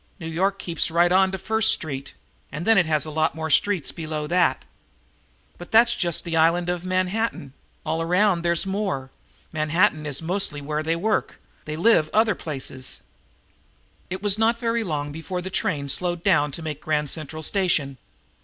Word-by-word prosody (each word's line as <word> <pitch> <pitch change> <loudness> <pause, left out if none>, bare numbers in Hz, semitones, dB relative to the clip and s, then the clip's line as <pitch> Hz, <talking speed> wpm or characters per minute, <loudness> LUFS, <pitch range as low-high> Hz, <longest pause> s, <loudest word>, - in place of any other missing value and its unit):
New 160 - -6
York 190 +5 0
keeps 170 -3 -2
right 170 +2 +3
on 190 +1 +4
to 190 - -3
First 220 +3 +2
Street, 140 -4 -3 0.4
and 155 +4 -5
then 225 - +5
it 190 -5 +3
has 155 -1 +1
a 155 - -6
lot 155 +1 0
more 160 -1 -4
streets 190 +1 +3
below 155 -2 -4
that. 175 +3 +1 0.9
But 175 - -10
that's 235 +2 +5
just 175 -7 -1
the 170 -2 -3
Island 170 +2 +3
of 180 -1 -2
Manhattan. 185 - -1 0.3
All 160 +1 -1
around 180 +2 +2
there's 170 +1 +2
a - - -7
lot - - -2
more. 190 -10 -3 0.4
Manhattan 155 +1 +1
is 140 -2 -1
mostly 175 -2 -1
where 150 +2 -3
they 160 +1 0
work. 210 +6 -1 0.3
They 150 - -4
live 165 -3 +3
other 220 0 +4
places." 130 -5 -5 1.1
It 190 +2 -5
was 205 0 +4
not 230 +1 +3
very 230 -1 -1
long 145 -6 -3
before 165 +4 -5
the 185 +1 -6
train 140 -5 -1
slowed 175 +4 -1
down 150 -7 +3
to 165 - -6
make 150 -2 -5
Grand 150 -2 -1
Central 155 0 -6
Station. 155 - 0
170 Hz, 180 wpm, -23 LUFS, 155-190 Hz, 1.1 s, then